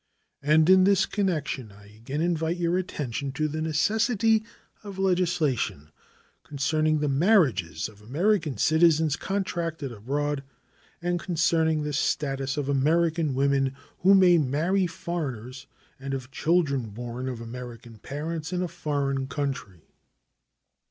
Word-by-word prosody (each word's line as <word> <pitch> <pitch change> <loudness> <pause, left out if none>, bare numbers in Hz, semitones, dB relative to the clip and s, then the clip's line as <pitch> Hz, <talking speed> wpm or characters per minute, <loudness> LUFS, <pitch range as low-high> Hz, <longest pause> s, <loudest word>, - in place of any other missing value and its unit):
And 155 +2 +4
in 185 0 +7
this 195 -1 +4
connection 155 - -2
I 100 +1 -17
again 135 +7 -4
invite 165 0 0
your 175 0 0
attention 140 -7 -3
to 155 +1 0
the 155 +1 -4
necessity 220 - +2 0.4
of 200 -2 -8
legislation 175 - 0 0.5
concerning 155 +2 0
the 150 - +1
marriages 140 - +2
of 105 -1 -16
American 155 - 0
citizens 160 -2 +3
contracted 170 -8 -3
abroad, 140 +6 -2 0.6
and 175 0 0
concerning 160 -3 +1
the 150 0 -3
status 135 -1 -1
of 145 -2 -2
American 155 +1 +1
women 135 0 +1 0.2
who 195 +2 +6
may 180 -3 +6
marry 165 +7 +1
foreigners 140 - -5 0.3
and 135 0 -3
of 130 0 -7
children 140 -8 +1
born 120 +4 -5
of 125 -3 -5
American 115 -1 -9
parents 160 - -5
in 180 0 -1
a - - -1
foreign 140 -5 -2
country. 135 - -4
150 Hz, 125 wpm, -26 LUFS, 135-175 Hz, 0.6 s, in